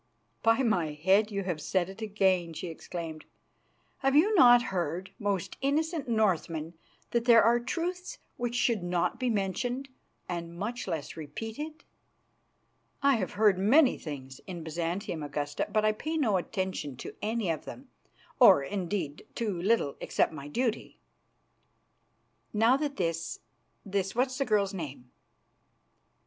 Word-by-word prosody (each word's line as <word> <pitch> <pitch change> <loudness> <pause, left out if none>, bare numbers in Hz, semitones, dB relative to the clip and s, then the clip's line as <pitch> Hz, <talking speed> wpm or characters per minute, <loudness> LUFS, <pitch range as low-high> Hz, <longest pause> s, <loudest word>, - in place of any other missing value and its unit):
"By 225 +4 +3
my 175 -10 +1
head, 190 +8 +3
you 200 -2 -2
have 175 -5 -3
said 180 +2 0
it 195 +3 -10
again," 190 -5 +1
she 175 - -5
exclaimed. 160 -1 -6 0.8
"Have 270 0 +2
you 380 +9 +5
not 245 - +7
heard, 175 +1 -2
most 200 -4 -2
innocent 305 +1 0
Northman, 175 -7 0 0.4
that 235 -1 +1
there 230 -3 +7
are 235 +2 +4
truths 355 +8 -3 0.2
which 240 0 -3
should 235 -4 +2
not 175 -1 -1
be 255 -1 0
mentioned 240 +6 -1 0.4
and 170 -1 -5
much 230 +5 -4
less 160 -5 -4
repeated?" 225 - -6 1.2
"I 280 -3 +5
have 190 -4 -3
heard 205 -2 +4
many 255 +8 +5
things 135 -4 -7
in 175 -3 -6
Byzantium, 170 +2 -3
Augusta, 145 0 -3
but 215 0 +2
I 215 - +5
pay 310 +9 -3
no 220 -10 +2
attention 180 - -3
to - - -7
any 215 -4 0
of 160 - -4
them - - -9 0.5
or, 140 - +8
indeed, 180 -1 -3
to 205 -7 -2
little 195 -8 +1
except - - +1
my 145 -2 -7
duty." 230 - -2 1.6
"Now 225 +4 +4
that 285 0 -2
this, 165 -2 -2 0.5
this 195 0 -2
what's 260 +2 0
the 275 - +1
girl's 205 -3 +1
name?" 140 -8 -7
200 Hz, 140 wpm, -29 LUFS, 170-240 Hz, 1.6 s, or